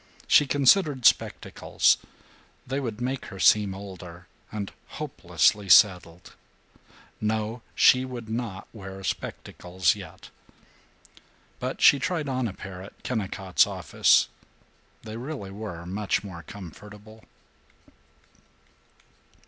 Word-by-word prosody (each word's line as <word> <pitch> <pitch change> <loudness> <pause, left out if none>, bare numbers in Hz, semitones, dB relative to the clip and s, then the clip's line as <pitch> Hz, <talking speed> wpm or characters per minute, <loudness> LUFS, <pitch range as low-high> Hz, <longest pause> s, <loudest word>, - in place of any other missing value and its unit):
She 145 - +5
considered 140 - +3
spectacles. - - +2 0.7
They 135 +2 -2
would 115 -5 -5
make 130 +2 -3
her 95 - -10
seem 100 -2 +4
older, 90 -3 -10 0.3
and 105 -2 -5 0.3
hopelessly 105 -2 0
settled. 90 -3 +4 0.9
No! 110 +2 -2
She 130 0 +5
would 125 -3 -7
not 110 -4 -5
wear 95 -3 -9
spectacles 90 -3 -2
yet. - - -12 1.3
But - - -4
she 140 - +7
tried 160 0 -2
on 130 -2 -1
a 100 - -6
pair 95 -1 -9
at 95 - -14
Kennicott's 95 -5 0
office. - - +3 0.8
They 110 0 -7
really 125 -6 -6
were 95 -5 -7
much 100 +3 -2
more 95 -4 -8
comfortable. 105 +5 -12
105 Hz, 105 wpm, -26 LUFS, 95-125 Hz, 1.3 s, she